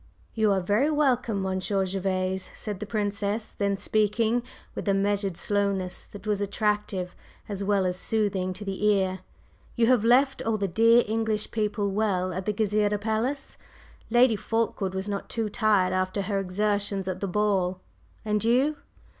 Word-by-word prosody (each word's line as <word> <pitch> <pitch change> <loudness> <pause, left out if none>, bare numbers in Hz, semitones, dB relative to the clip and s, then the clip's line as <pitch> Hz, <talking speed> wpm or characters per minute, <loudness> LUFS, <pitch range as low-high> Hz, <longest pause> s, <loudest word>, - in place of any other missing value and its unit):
"You 220 -2 +2
are 195 -1 +2
very 210 +11 +2
welcome, 250 -9 +1
Monsieur 190 +1 0
Gervase," 185 0 -2
said 205 -3 -5
the 210 - -5
Princess 205 0 -2
then, 200 -1 -1
speaking 215 +3 +1 0.3
with - - -6
a 195 - +3
measured 200 -2 0
slowness 200 -3 -1
that 205 -1 -12
was 210 -1 0
attractive 205 -3 -1 0.3
as 200 -1 -4
well 195 -1 +2
as 180 0 -1
soothing 200 -4 0
to 205 +3 -8
the 195 +1 -4
ear. 190 -3 +2 0.6
"You 235 - +3
have 245 -2 +4
left 265 +4 +4
all 225 -1 0
the 200 -1 -1
dear 230 +6 +5
English 220 -1 -1
people 210 -2 -1
well 190 -3 0
at 185 +3 -5
the - - +3
Gezireh 210 0 +1
Palace? 230 +6 -2 0.5
Lady 240 0 +5
Fulkeward 210 -3 -1
was 190 +1 -3
not 200 -1 -4
too 225 -2 -2
tired 205 -3 +2
after 185 +2 0
her 200 -1 -1
exertions 200 0 -1
at 185 -1 -3
the 200 - -2
ball? 190 -2 +1 0.5
And 210 -1 0
you?" 260 +6 +2
205 Hz, 165 wpm, -26 LUFS, 190-220 Hz, 0.6 s, dear